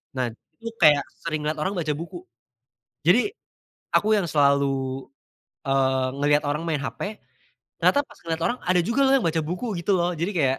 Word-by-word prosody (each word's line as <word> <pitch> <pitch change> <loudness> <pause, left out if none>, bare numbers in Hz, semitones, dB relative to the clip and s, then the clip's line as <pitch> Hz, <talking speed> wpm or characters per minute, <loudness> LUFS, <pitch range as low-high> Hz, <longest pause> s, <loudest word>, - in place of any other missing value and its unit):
Nah, 125 -1 0 0.3
itu 230 - -8
kayak 150 -4 +6 0.2
sering 155 -2 -2
lihat 155 - 0
orang 190 +5 0
baca 170 -4 -3
buku, 260 - -8 0.8
jadi 410 - +4 0.6
aku 215 +1 +3
yang 175 - -3
selalu, 140 -2 +1 0.6
eee, 130 -1 +2
ngelihat 145 +1 +3
orang 150 +3 -2
main 155 -4 -1
HP 205 +9 -5 0.6
ternyata 285 - +5
pas - - -18
ngelihat 165 0 -3
orang 240 +1 -1
ada 180 0 +2
juga 235 +10 +1
loh 265 - +4
yang 200 - -2
baca 160 -1 +1
buku 185 +8 -3
gitu 185 +2 +1
loh. 175 +1 0
Jadi 170 +4 -2
kayak 140 -9 +1
160 Hz, 175 wpm, -24 LUFS, 140-185 Hz, 0.8 s, kayak